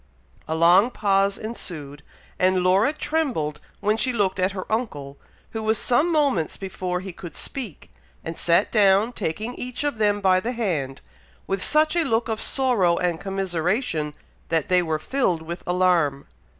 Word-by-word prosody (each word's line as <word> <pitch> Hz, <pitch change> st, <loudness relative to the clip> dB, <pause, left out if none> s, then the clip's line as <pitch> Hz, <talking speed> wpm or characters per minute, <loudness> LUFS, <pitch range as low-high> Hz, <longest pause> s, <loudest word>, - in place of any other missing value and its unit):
A 160 Hz, -, -1 dB
long 175 Hz, +7 st, +5 dB
pause 200 Hz, -3 st, +1 dB
ensued; 155 Hz, -10 st, -6 dB, 0.4 s
and 185 Hz, 0 st, +3 dB
Laura 190 Hz, +8 st, +4 dB
trembled 260 Hz, -, -2 dB, 0.2 s
when 210 Hz, +2 st, +1 dB
she 240 Hz, +4 st, 0 dB
looked 200 Hz, -5 st, 0 dB
at 185 Hz, +1 st, +1 dB
her 185 Hz, -1 st, -5 dB
uncle, 145 Hz, -, -3 dB, 0.3 s
who 220 Hz, -, -4 dB
was 220 Hz, 0 st, +1 dB
some 285 Hz, +11 st, +2 dB
moments 280 Hz, -, +1 dB
before 185 Hz, -2 st, -4 dB
he 190 Hz, -1 st, -7 dB
could 170 Hz, -3 st, -10 dB
speak, 240 Hz, -, -7 dB, 0.3 s
and 165 Hz, -, -4 dB
sat 170 Hz, +5 st, +2 dB
down 205 Hz, +2 st, +4 dB
taking 220 Hz, +6 st, -3 dB
each 250 Hz, +2 st, -5 dB
of 290 Hz, -6 st, -2 dB
them 205 Hz, -1 st, +2 dB
by 190 Hz, -2 st, +4 dB
the 235 Hz, +6 st, -3 dB
hand, 160 Hz, -, -2 dB, 0.4 s
with 195 Hz, -1 st, -2 dB
such 310 Hz, +1 st, +3 dB
a 340 Hz, -, +3 dB
look 230 Hz, -5 st, 0 dB
of 220 Hz, -1 st, -2 dB
sorrow 225 Hz, -11 st, +2 dB
and 175 Hz, -2 st, -1 dB
commiseration, 185 Hz, -, -1 dB, 0.3 s
that 165 Hz, +4 st, 0 dB
they 180 Hz, -1 st, +4 dB
were 160 Hz, -2 st, -1 dB
filled 180 Hz, -, -1 dB
with 170 Hz, +2 st, -6 dB
alarm. 175 Hz, -6 st, +2 dB
195 Hz, 165 wpm, -24 LUFS, 170-230 Hz, 0.4 s, long